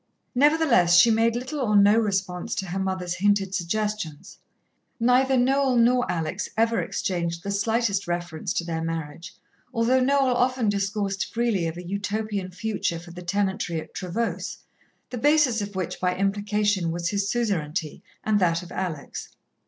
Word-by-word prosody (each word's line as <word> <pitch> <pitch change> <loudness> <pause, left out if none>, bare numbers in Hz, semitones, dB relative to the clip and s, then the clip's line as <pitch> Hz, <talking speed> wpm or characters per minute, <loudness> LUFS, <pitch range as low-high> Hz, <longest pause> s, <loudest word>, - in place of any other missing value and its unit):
Nevertheless, 265 - +4
she 230 +6 +7
made 225 +1 +2
little 255 +5 -4
or 215 -6 +1
no 205 +1 +6
response 195 -5 -1
to 195 - -2
her 190 +2 -2
mother's 185 -2 -2
hinted 200 0 +2
suggestions. 200 -3 -3 0.6
Neither 255 +3 +3
Noel 265 +1 +2
nor 245 +1 +3
Alex 165 +3 -3
ever 230 +1 +2
exchanged 170 -2 -2
the 200 - -3
slightest 205 -1 0
reference 175 0 -3
to - - -1
their 165 -1 -3
marriage, 165 +1 -5 0.4
although 245 +2 +2
Noel 270 0 +3
often 250 -2 +1
discoursed 200 -1 -1
freely 225 -7 0
of 165 +1 -5
a 180 - -8
Utopian 200 0 -3
future 185 -2 -2
for 170 +1 -11
the 175 +1 -9
tenantry 190 -2 -1
at - - -11
Trevose, 205 +5 -3 0.5
the 250 - -4
basis 290 -5 +3
of 205 -1 -6
which, 185 -2 -3
by 180 0 0
implication, 205 -1 0
was 170 +1 -2
his 200 0 -1
suzerainty 165 -10 -2 0.2
and 215 -1 +2
that 170 -2 +1
of 175 - -12
Alex. 170 -6 -5
200 Hz, 155 wpm, -25 LUFS, 175-230 Hz, 0.6 s, she